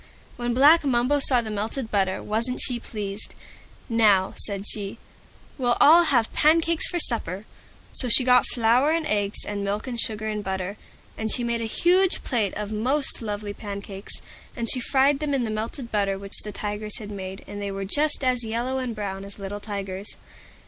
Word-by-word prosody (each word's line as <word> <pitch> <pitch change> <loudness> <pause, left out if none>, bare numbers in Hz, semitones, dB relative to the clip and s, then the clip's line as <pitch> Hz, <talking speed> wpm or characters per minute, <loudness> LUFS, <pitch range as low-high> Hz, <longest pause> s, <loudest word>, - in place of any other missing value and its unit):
When 240 -1 -2
Black 300 +6 +6
Mumbo 265 +1 +2
saw 255 -3 +3
the 220 -2 -6
melted 220 +4 -3
butter, 190 -2 0
wasn't 230 +4 -2
she 245 -2 +3
pleased! 205 -3 -6 0.5
"Now," 210 -5 +3
said 200 -1 -4
she, 205 +1 -2 0.6
"we'll 245 -2 +2
all 335 +3 +7
have 240 -7 +2
pancakes 325 +1 +3
for 355 - -2
supper!" 215 - -2 0.5
So 250 - 0
she 255 - +6
got 250 0 +5
flour 240 +4 +3
and 325 0 +1
eggs 205 -7 0
and 205 -1 -3
milk 205 +2 -2
and 240 -3 -3
sugar 215 -1 -3
and 210 -1 -3
butter, 190 +1 -3 0.4
and 220 -1 -1
she 245 - +2
made 235 -1 -1
a - - -2
huge 360 - +3
big - - -3
plate 220 -7 0
of 210 0 -4
most 255 +8 0
lovely 205 -2 -4
pancakes. 200 -1 -7 0.3
And 235 -2 +2
she 255 - +2
fried 270 +3 +2
them 295 -2 -1
in 260 - 0
the 220 - -2
melted 230 +3 -5
butter 200 -2 +1
which 200 0 -4
the 210 - -5
Tigers 210 +1 -3
had 210 -2 -8
made, 190 -1 -7
and 205 0 -7
they 200 - -3
were 195 0 -4
just 295 +7 +2
as 250 -2 +1
yellow 240 +4 -2
and 250 -3 -3
brown 195 -2 -4
as 200 0 -9
little 200 0 -6
Tigers. 200 -1 -5
220 Hz, 190 wpm, -25 LUFS, 205-255 Hz, 0.6 s, all